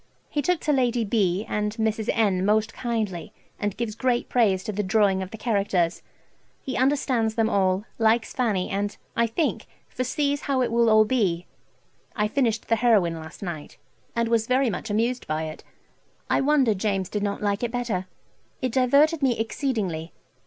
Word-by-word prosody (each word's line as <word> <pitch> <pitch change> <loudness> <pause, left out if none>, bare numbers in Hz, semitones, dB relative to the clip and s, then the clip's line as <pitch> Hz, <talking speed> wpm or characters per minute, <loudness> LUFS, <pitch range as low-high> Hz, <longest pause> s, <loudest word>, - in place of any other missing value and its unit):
He 295 - 0
took 360 +3 +1
to 300 - +1
Lady 245 -3 +1
B. 200 -2 +1
and 210 0 -2
Mrs. 220 -1 -1
N. 200 -5 +2
most 215 +2 +2
kindly, 215 -8 -3 0.3
and 205 -2 -2
gives 230 -2 -2
great 245 +1 0
praise 200 -6 +2
to 215 - -3
the 210 0 -1
drawing 200 -1 +2
of 190 - -5
the 220 - -8
characters. 200 -6 0 0.6
He 260 - -5
understands 255 -5 +1
them 225 -1 +1
all, 190 +1 +1
likes 225 0 +2
Fanny, 215 -8 0
and, 200 +1 -2 0.2
I 235 0 +2
think, 305 +8 -1 0.2
foresees 280 +3 -1
how 270 -3 +1
it 240 - -1
will 235 0 +3
all 215 0 +6
be. 195 -8 0 0.7
I 210 -2 +1
finished 230 -1 0
the 230 - +2
"Heroine" 215 -8 +3
last 160 +4 -10
night, 170 -5 -6 0.4
and 235 0 +1
was 230 -1 +1
very 255 -1 +2
much 210 - -5
amused 235 +4 0
by 155 +1 -1
it. 155 0 -7 0.7
I - - +3
wonder 270 -5 +3
James 195 -2 -1
did 210 - -3
not 205 0 -2
like 205 0 0
it 240 - -1
better. 230 -6 -2 0.5
It 255 -2 -1
diverted 280 +6 +3
me 255 -4 +2
exceedingly. 215 - -2
220 Hz, 175 wpm, -25 LUFS, 200-245 Hz, 0.7 s, all